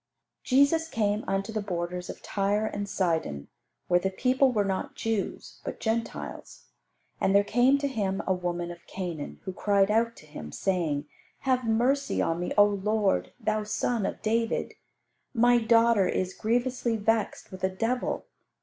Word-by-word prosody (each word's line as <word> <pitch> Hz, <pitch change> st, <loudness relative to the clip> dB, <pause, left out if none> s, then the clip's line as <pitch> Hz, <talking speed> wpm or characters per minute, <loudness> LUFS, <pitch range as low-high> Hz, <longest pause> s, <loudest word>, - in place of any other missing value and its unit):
Jesus 280 Hz, +5 st, +3 dB
came 210 Hz, -3 st, 0 dB
unto 195 Hz, +3 st, -1 dB
the 215 Hz, -, -1 dB
borders 180 Hz, -2 st, -4 dB
of -, -, -8 dB
Tyre 205 Hz, +2 st, 0 dB
and 205 Hz, -2 st, -3 dB
Sidon, 160 Hz, -, -1 dB, 0.4 s
where 175 Hz, 0 st, +4 dB
the 190 Hz, -, 0 dB
people 255 Hz, +7 st, +2 dB
were 210 Hz, -4 st, +1 dB
not 190 Hz, -1 st, -2 dB
Jews, 225 Hz, -3 st, -3 dB
but -, -, -5 dB
Gentiles. 225 Hz, 0 st, -4 dB, 0.6 s
And 195 Hz, -, +2 dB
there 200 Hz, -, +6 dB
came 245 Hz, +6 st, +4 dB
to 280 Hz, 0 st, -1 dB
Him 200 Hz, -7 st, -1 dB
a 190 Hz, -, +2 dB
woman 175 Hz, -1 st, -3 dB
of 170 Hz, 0 st, -12 dB
Canaan, 175 Hz, -6 st, -5 dB
who 190 Hz, -, -5 dB
cried 200 Hz, +1 st, +2 dB
out 230 Hz, +1 st, +2 dB
to -, -, -15 dB
Him, 75 Hz, -, -9 dB
saying, 160 Hz, -, -1 dB, 0.4 s
"Have 255 Hz, -2 st, +1 dB
mercy 260 Hz, +5 st, +2 dB
on 165 Hz, +1 st, +1 dB
me, 180 Hz, -, -3 dB
O 205 Hz, -, +9 dB
Lord, 200 Hz, -, +1 dB
Thou 215 Hz, 0 st, 0 dB
son 215 Hz, +1 st, 0 dB
of -, -, -6 dB
David; 225 Hz, +1 st, 0 dB, 0.6 s
my 240 Hz, +1 st, +5 dB
daughter 230 Hz, -3 st, +4 dB
is 185 Hz, 0 st, -1 dB
grievously 240 Hz, +1 st, 0 dB
vexed 220 Hz, 0 st, 0 dB
with 185 Hz, 0 st, -9 dB
a 190 Hz, -, +3 dB
devil." 225 Hz, +7 st, -1 dB
205 Hz, 160 wpm, -28 LUFS, 185-230 Hz, 0.6 s, O